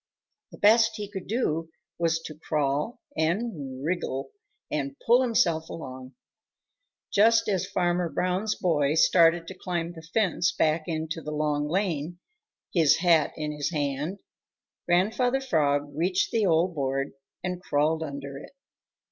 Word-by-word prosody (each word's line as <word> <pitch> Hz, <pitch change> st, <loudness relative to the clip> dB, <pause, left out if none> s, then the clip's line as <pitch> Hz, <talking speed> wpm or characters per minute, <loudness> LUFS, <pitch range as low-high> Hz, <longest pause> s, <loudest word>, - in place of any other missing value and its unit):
The -, -, -12 dB
best 220 Hz, +1 st, +5 dB
he 210 Hz, -2 st, -5 dB
could 195 Hz, -2 st, -7 dB
do 165 Hz, -8 st, -1 dB, 0.3 s
was 165 Hz, -1 st, +1 dB
to 165 Hz, -1 st, -8 dB
crawl 150 Hz, -, -2 dB
and 160 Hz, -, -2 dB
wriggle 160 Hz, -6 st, -2 dB, 0.4 s
and 140 Hz, -2 st, -2 dB
pull 240 Hz, +2 st, +5 dB
himself 170 Hz, -10 st, +1 dB
along. 130 Hz, -4 st, -8 dB, 1.0 s
Just 225 Hz, +3 st, +5 dB
as 190 Hz, -4 st, 0 dB
Farmer 175 Hz, -1 st, 0 dB
Brown's 185 Hz, +6 st, -1 dB
boy 150 Hz, -4 st, +1 dB
started 165 Hz, 0 st, +5 dB
to -, -, -6 dB
climb 175 Hz, -2 st, -3 dB
the 165 Hz, -, -10 dB
fence 180 Hz, 0 st, +1 dB
back 155 Hz, 0 st, +1 dB
into 160 Hz, 0 st, -3 dB
the 150 Hz, -, -6 dB
Long 150 Hz, -1 st, 0 dB
Lane, 175 Hz, -2 st, -1 dB, 0.6 s
his 160 Hz, -5 st, +5 dB
hat 165 Hz, -3 st, +3 dB
in 150 Hz, -1 st, -3 dB
his 145 Hz, -1 st, -2 dB
hand, 150 Hz, +3 st, -2 dB, 0.7 s
Grandfather 220 Hz, +9 st, +2 dB
Frog 145 Hz, -, +1 dB
reached 180 Hz, +4 st, +1 dB
the 220 Hz, -3 st, +2 dB
old 170 Hz, +2 st, +2 dB
board 135 Hz, -2 st, -1 dB, 0.3 s
and 180 Hz, 0 st, -3 dB
crawled 155 Hz, -1 st, +1 dB
under 140 Hz, -2 st, -6 dB
it. 150 Hz, -, -13 dB
165 Hz, 140 wpm, -27 LUFS, 150-185 Hz, 1.0 s, best